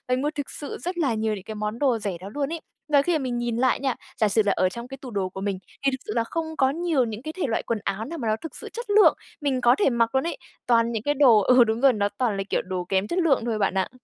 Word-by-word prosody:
mình 260 - -2
mua 295 +1 0
thực 285 -2 -4
sự 290 - -6
rất 360 0 -5
là 275 -8 +1
nhiều 220 -1 -1
những 190 - -9
cái 220 0 -7
món 210 +2 -3
đồ 260 -5 +2
rẻ 200 -4 -3
đó 195 +2 -8
luôn 290 +2 -2
ấy. 335 - -4 0.3
Và 285 -2 +5
khi 350 +4 0
mà - - -4
mình 250 -3 -2
nhìn 240 -1 -1
lại 255 0 +2
nha, 265 -2 0 0.3
giả 215 - +5
sử 215 +2 +3
là 200 - +3
ở 185 - +2
trong 235 +4 -7
cái 270 +1 -8
tủ 255 -3 -8
đồ 190 -2 -1
của 190 - -8
mình, 195 -2 -2 0.3
thì 275 - +4
thực 260 - -2
sự - - -4
là 230 - +2
không 325 +7 -3
có 265 -1 +4
nhiều 320 -3 +1
những 220 0 -6
cái 310 +2 -6
thể - - -2
loại 225 - -1
quần 230 -2 -2
áo 200 +3 -2
nào 330 +5 -6
mà 235 -5 -3
nó 215 - +2
thực 320 - -8
sự - - -7
chất 475 -2 -6
lượng 415 +1 +6 0.3
mình 265 -3 0
có 240 +2 +5
thể 400 - +4
mặc 235 +1 +1
luôn 265 - +3
ấy, - - -3 0.3
toàn 230 -1 +3
những 220 -1 -3
cái 290 - +1
đồ 260 -7 +6
ừ, 250 +3 +6
đúng 220 +2 -1
rồi, 270 -2 +6
nó 205 -1 0
toàn 230 -6 0
là, 195 - -1
kiểu, - - +1
đồ 185 -1 -3
kém 195 +1 +1
chất 360 - -1
lượng 290 -9 +3
thôi 220 -2 -1
bạn 195 - +1
ạ. 190 -1 0
240 Hz, 325 wpm, -25 LUFS, 215-280 Hz, 0.3 s, lượng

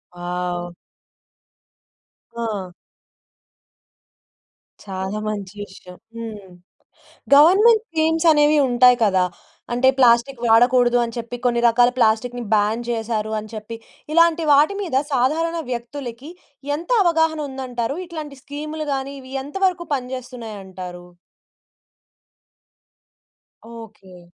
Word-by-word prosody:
Wow! 175 0 -4 1.7
ఆ! 195 -5 -4 2.1
చాలా 190 +1 -4
మంచి 205 -2 -5
విషయం. 180 -2 -14 0.2
హ్మ్. 215 -4 -8 0.9
గవర్నమెంట్ 415 +9 +6
స్కీమ్స్ 320 0 0
అనేవి 295 0 +4
ఉంటాయి 245 0 +5
కదా! 190 -3 +3 0.5
అంటే 260 +2 +4
ప్లాస్టిక్కు 240 0 +3
వాడకూడదు 245 +1 +4
అని 230 0 -8
చెప్పి, 235 +1 -5
కొన్ని 235 -1 +2
రకాల 240 +1 +4
ప్లాస్టిక్‌ని 240 +1 +1
బ్యాన్ 215 +2 +1
చేశారు 220 -2 -2
అని 215 +1 -10
చెప్పి, 220 +1 -7 0.4
ఇలాంటి 335 0 +4
వాటి 295 +8 +4
మీద 335 -9 -4 0.2
సాధారణ 315 +7 +1
వ్యక్తులకి 245 +3 -6 0.5
ఎంత 335 - -10
అవగాహనుందంటారు? 285 -7 -1
ఇట్లాంటి 310 -5 -8
స్కీములు 305 +2 -6
గాని, 270 +1 -4
ఇవి 260 +1 -12
ఎంత 290 - -12
వరకు 355 -2 -1
పనిజేస్తున్నాయంటారు? 215 -9 -8 2.7
ఓకే. 200 -6 -13
245 Hz, 95 wpm, -21 LUFS, 215-295 Hz, 2.7 s, గవర్నమెంట్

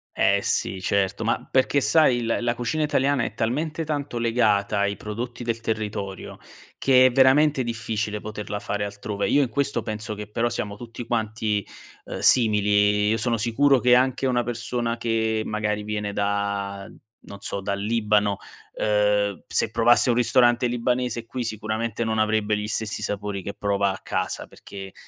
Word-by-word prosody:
Eh - - +3
sì, 95 - -1
certo, 100 +2 0
ma 115 - -1
perché 130 +2 +2
sai 145 -3 +4
il 115 -1 0
la 120 0 0
cucina 120 +6 -2
italiana 140 -3 +1
è - - -4
talmente 150 +8 -1
tanto 145 -4 -3
legata 110 -3 +1
ai 100 0 +1
prodotti 120 +3 -6
del 115 -1 -2
territorio 105 -3 -4 0.4
che 130 -1 +5
è 130 - +5
veramente 135 +2 +4
difficile 110 -2 -3
poterla 105 -1 -5
fare 105 0 -3
altrove. 100 0 -3
Io 145 - +4
in 130 - -2
questo 140 +2 -1
penso 110 0 -4
che 105 0 -6
però 115 +3 -1
siamo 105 -3 -4
tutti 115 +2 -8
quanti, 110 -2 -1 0.4
ehm, - - -6
simili. 105 -3 +3
Io 110 - +2
sono 115 +1 0
sicuro 130 +5 +3
che 125 0 +4
anche 130 +2 +3
una 125 -2 +1
persona 120 0 -3
che, 110 -1 0
magari 105 -1 -2
viene 105 -1 -3
da 100 -1 -2 0.3
non 100 - -12
so, 100 - -4
dal 100 0 -2
Libano, 105 -2 +1 0.4
ehm, 105 -2 +1
se - - 0
provasse 115 +3 +4
un 120 - +3
ristorante 120 0 +3
libanese 120 -1 -1
qui 125 +2 -4
sicuramente 110 0 -3
non 110 -1 -1
avrebbe 110 -1 +1
gli 105 0 -4
stessi 110 0 -2
sapori 100 -1 -3
che 100 - -5
prova 100 -1 0
a 95 - -7
casa, - - -3
perché 95 -1 -10
110 Hz, 165 wpm, -24 LUFS, 105-120 Hz, 0.4 s, che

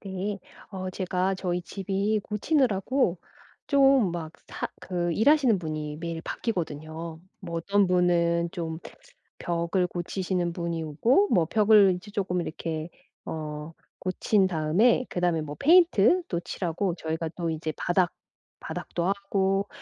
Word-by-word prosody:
네. 195 +1 -4 0.3
어 185 -2 -5
제가 185 0 -1
저희 180 -2 -2
집이 195 +3 -1
고치느라고 215 - +1 0.5
좀 270 - +4
막 160 -2 -5
사 - - -4
그 175 -2 -2
일 220 - +3
하시는 275 -9 +5
분이 155 -3 -4
매일 165 -1 -4
바뀌거든요. 160 -5 -4 0.2
뭐 170 -3 -5
어떤 200 +4 +2
분은 170 -1 +2
좀 165 -3 -4 0.6
벽을 170 +2 0
고치시는 175 0 -2
분이 170 -1 -3
오고 235 - +3
뭐 175 - +4
벽을 210 0 +5
이제 185 +4 -11
쪼끔 190 -4 -1
이렇게 160 -1 -4 0.4
어 150 0 -5 0.3
고친 190 +2 +2
다음에 185 +9 +2
그다음에 175 -3 0
뭐 150 -1 -7
페인트도 335 - +4
칠하고 175 +1 -2
저희가 160 0 -3
또 170 -2 -2
이제 160 0 -3
바닥 175 -1 +1 0.5
바닥도 170 +1 -4
하고 195 0 0
180 Hz, 265 characters per minute, -27 LUFS, 165-200 Hz, 0.6 s, 하시는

